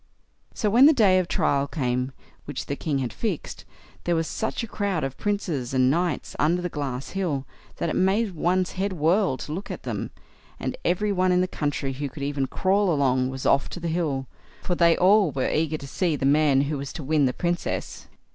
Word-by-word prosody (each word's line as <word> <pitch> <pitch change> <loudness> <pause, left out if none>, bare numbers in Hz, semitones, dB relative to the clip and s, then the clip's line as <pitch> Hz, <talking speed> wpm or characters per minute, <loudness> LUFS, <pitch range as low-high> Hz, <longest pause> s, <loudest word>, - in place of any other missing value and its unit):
So 215 - 0
when 250 +6 +8
the 315 - +7
day 200 -8 +5
of 180 - -1
trial 140 -4 +1
came, 125 -3 -1 0.3
which 145 -2 -5
the 140 - -3
king 145 -1 -2
had 130 -3 -3
fixed, 205 -9 -4 0.4
there 175 - +2
was 165 0 0
such 220 +7 -3
a - - -4
crowd 200 -7 -1
of 135 0 -3
princes 165 -12 -2
and 130 0 +4
knights 170 0 -1
under 165 +4 +2
the 180 0 -3
glass 135 -4 -4
hill, 165 -9 -2 0.3
that - - -2
it - - -1
made 195 +2 +2
one's 180 +3 +1
head 195 +1 -2
whirl 170 -1 +2
to 150 - -7
look 190 +5 -5
at - - -6
them; - - -3 0.5
and - - -3
every 205 +3 +1
one 185 -1 +2
in 180 0 +3
the 185 - +1
country 145 -5 -2
who 140 +2 -4
could 140 +2 -8
even 140 -1 -1
crawl 195 +3 +1
along 130 -4 +2
was 130 0 -6
off 140 - +3
to - - -7
the 170 -1 -3
hill, 155 -6 -1 0.4
for 180 - -1
they 170 -1 +4
all 195 0 +5
were 135 -2 -1
eager 155 0 0
to 140 - -9
see 170 +2 0
the 135 - -2
man 140 -1 +4
who 145 0 -2
was 140 0 -5
to 155 - -6
win 150 0 +2
the - - +1
Princess. 175 +3 -3
160 Hz, 215 wpm, -25 LUFS, 140-185 Hz, 0.5 s, when